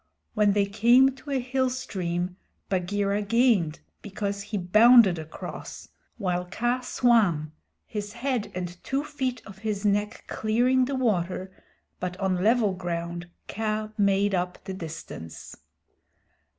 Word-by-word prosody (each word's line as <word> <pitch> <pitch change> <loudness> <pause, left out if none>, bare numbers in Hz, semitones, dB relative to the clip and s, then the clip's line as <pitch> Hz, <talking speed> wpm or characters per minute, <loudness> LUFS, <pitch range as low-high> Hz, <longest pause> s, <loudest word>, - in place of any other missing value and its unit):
When 210 -2 +3
they 200 -1 +3
came 240 +6 +4
to 285 - -12
a 275 -2 +1
hill 260 +1 0
stream, 180 -7 -3 0.3
Bagheera 200 +2 0
gained, 210 -7 +2 0.2
because 200 0 -4
he 205 +1 -4
bounded 210 0 +6
across 160 0 -8 0.3
while 180 -4 -1
Kaa 240 +7 -1
swam, 210 -12 +2 0.3
his 205 -1 -5
head 240 -2 -2
and 175 -1 -5
two 275 +2 -1
feet 265 -5 -3
of 195 -2 -12
his 210 -1 -3
neck 205 +1 0
clearing 245 +4 +2
the 275 +2 -2
water, 190 -6 -1 0.5
but 180 0 -4
on 185 -2 0
level 220 -2 +3
ground 170 -1 -4 0.2
Kaa 215 0 -2
made 200 -1 +2
up 180 -1 -1
the 190 - -5
distance. 160 - -8
205 Hz, 130 wpm, -26 LUFS, 180-235 Hz, 0.5 s, bounded